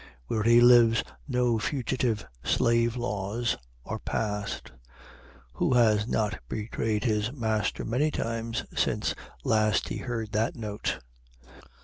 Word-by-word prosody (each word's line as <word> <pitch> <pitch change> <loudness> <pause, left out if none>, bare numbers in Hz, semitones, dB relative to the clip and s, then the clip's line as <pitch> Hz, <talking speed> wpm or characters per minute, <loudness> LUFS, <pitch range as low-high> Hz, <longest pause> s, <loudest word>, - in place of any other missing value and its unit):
Where 110 - -1
he 115 +2 +6
lives 120 -1 +6 0.2
no 125 -4 +1
fugitive 120 -3 -1 0.2
slave 115 0 +2
laws 110 0 -1 0.3
are - - -4
passed. 105 -2 -3 0.8
Who 125 - +1
has 110 -3 +4
not 110 -3 0
betrayed 110 +1 -2
his 110 -1 +1
master 110 -6 -1
many 130 +7 +1
times 115 -4 -3
since - - +1 0.3
last 110 -2 +2
he - - -3
heard 115 -4 -4
that 110 +3 0
note? 105 -3 -3
115 Hz, 115 wpm, -28 LUFS, 105-120 Hz, 0.8 s, he